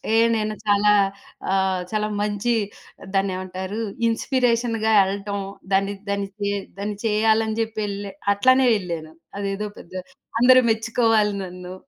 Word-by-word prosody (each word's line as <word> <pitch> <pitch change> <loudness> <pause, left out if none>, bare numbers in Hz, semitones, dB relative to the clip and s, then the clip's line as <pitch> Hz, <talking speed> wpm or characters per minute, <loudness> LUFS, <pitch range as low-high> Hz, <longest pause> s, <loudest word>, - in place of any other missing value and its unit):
ఏ - - +5 0.2
నేను 215 -1 -1
చాలా 205 0 +4 0.6
ఆహ్, 190 -1 +1
చాలా 215 -1 0
మంచి 210 +3 0 0.6
దాన్నేమంటారు 185 +1 -2 0.3
ఇన్స్‌పి‌రేషన్‌గా 230 -2 +1
ఎల్లటం, 200 +1 -3 0.3
దాన్ని, 195 +1 +2 0.2
దాన్ని 200 0 -1
చె 200 0 0 0.3
దాన్ని 205 +1 -3
చేయాలని 220 0 +2
జెప్పి 220 -1 -3
ఎళ్ళే 200 0 -5 0.2
అట్లనే 255 +5 +4
ఎళ్ళాను. 165 -4 -6 0.2
అదేదో 200 +1 -2
పెద్ద 170 - -14 0.5
అందరూ 255 +1 +7
మెచ్చుకోవాలి 225 -1 +2
నన్ను. 180 0 -8
205 Hz, 115 wpm, -23 LUFS, 195-225 Hz, 0.6 s, అందరూ